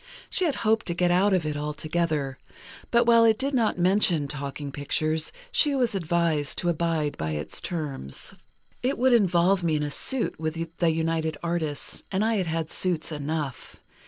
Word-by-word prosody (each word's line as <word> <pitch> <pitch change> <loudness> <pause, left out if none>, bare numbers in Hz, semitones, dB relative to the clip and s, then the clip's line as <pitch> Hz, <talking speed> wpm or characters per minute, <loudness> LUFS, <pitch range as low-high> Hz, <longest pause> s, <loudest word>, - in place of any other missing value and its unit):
She 370 - +1
had 305 - +1
hoped 220 +1 +2
to 170 - -1
get 175 0 +2
out 190 +3 +4
of 185 -4 +2
it 150 -1 -2
altogether; 150 -2 -2 0.5
but 235 0 +4
while 230 -1 +6
it 220 -1 +5
did 275 +3 -2
not 230 -7 +1
mention 180 -4 +3
talking 140 0 -5
pictures, 155 +3 0 0.2
she 305 - +3
was 245 -5 +1
advised 170 -5 0
to 175 - 0
abide 165 -3 0
by 80 0 -2
the 75 - -3
terms. 145 - -4 0.5
"It 260 +3 0
would 255 +1 +4
involve 185 -3 +3
me 165 -2 +1
in 150 - 0
a 145 - -3
suit 260 - 0
with 165 +1 -4
the 170 - +3
United 160 -1 -1
Artists, 165 -4 -2
and 195 +2 +1
I 225 -1 +1
had 185 -3 -1
had 160 0 -2
suits 175 -3 0
enough. 150 -2 -4
165 Hz, 180 wpm, -26 LUFS, 150-195 Hz, 0.5 s, while